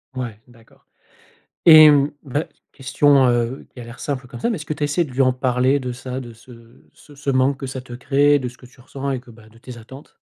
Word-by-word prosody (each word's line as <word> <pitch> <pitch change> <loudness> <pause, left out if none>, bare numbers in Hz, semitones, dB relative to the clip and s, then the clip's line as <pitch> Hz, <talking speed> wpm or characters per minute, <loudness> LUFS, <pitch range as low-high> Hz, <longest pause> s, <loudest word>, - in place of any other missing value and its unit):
Ouais, 120 -5 -6
d'accord 115 -2 -23 0.8
et 155 -2 +10
mmh. 145 0 +2
Bah, 145 +3 -3 0.3
question, 135 0 +2
heu, 120 +2 -1
qui 125 - -13
a - - -8
l'air 120 +1 -12
simple 135 -3 -4
comme - - -11
ça 235 - 0
mais, 225 - -2
est - - -6
ce 155 - -8
que 155 - -3
tu 150 - -9
as - - +3
essayé 145 +4 0
de 135 - -12
lui 130 - -4
en 130 -1 +3
parler 130 +2 +1
de 125 -1 -5
ça, 130 +1 -6
de 120 -2 -10
ce 115 0 -18
ce 145 - -18
ce 140 0 -4
manque 130 +1 +1
que 135 - -6
ça 130 0 -6
te 125 - -14
crée, 140 +4 +2
de 130 -2 -4
ce 125 - -14
que - - -18
tu 125 +1 -21
ressens 140 +2 -6
et 130 -2 -3
que 125 - -18
bah 110 -1 -17
de 115 +1 -21
tes 125 0 -11
attentes? 130 +5 -14
130 Hz, 270 wpm, -20 LUFS, 120-140 Hz, 0.8 s, et